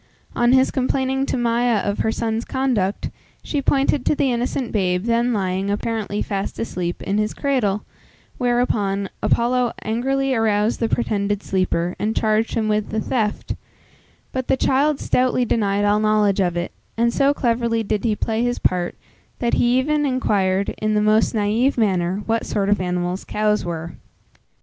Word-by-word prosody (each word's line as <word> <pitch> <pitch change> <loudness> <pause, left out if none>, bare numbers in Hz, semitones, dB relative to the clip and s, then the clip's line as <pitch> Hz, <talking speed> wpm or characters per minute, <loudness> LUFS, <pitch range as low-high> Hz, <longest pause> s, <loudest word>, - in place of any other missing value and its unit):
On 240 0 +3
his 260 0 +4
complaining 265 +1 0
to - - -1
Maia 240 0 +2
of 200 0 -2
her 220 - +1
son's 225 0 -2
conduct, 240 -9 -1 0.3
she 290 - -2
pointed 275 -1 +2
to - - +3
the 275 -2 +1
innocent 245 +1 -2
babe 180 -3 0
then 235 +1 +1
lying, 190 -2 -1
apparently 210 0 -2
fast 195 -1 -3
asleep, 180 -6 -3
in 200 +2 0
his 210 0 -1
cradle, 235 -8 0 0.5
whereupon, 215 -6 0
Apollo 245 0 +1
angrily 270 +4 0
aroused 220 -1 +1
the 230 - 0
pretended 205 -3 -1
sleeper, 180 -2 0
and 215 +1 -1
charged 220 +1 +1
him 220 -1 0
with 210 -1 0
the 220 - -1
theft; 215 -2 -1 0.8
but 260 -1 -3
the - - +2
child 275 +3 +2
stoutly 250 0 +1
denied 205 -3 +1
all 205 +1 +3
knowledge 210 -2 +2
of 175 -2 +1
it, 175 - -3 0.3
and 235 +1 +2
so 275 0 +3
cleverly 235 -4 0
did 210 -1 -1
he 220 -3 +1
play 220 +1 -1
his 245 0 0
part, 180 -1 0 0.4
that 235 -1 -1
he 245 +1 +3
even 295 +3 +1
inquired 200 -8 +1
in 215 0 0
the 210 - +3
most 215 +2 +3
naive 220 +6 +1
manner 190 -3 +1
what 225 0 0
sort 200 -1 0
of 205 -2 +2
animals 180 +1 -2
cows 210 0 0
were. 170 -1 -5
220 Hz, 165 wpm, -21 LUFS, 200-245 Hz, 0.8 s, his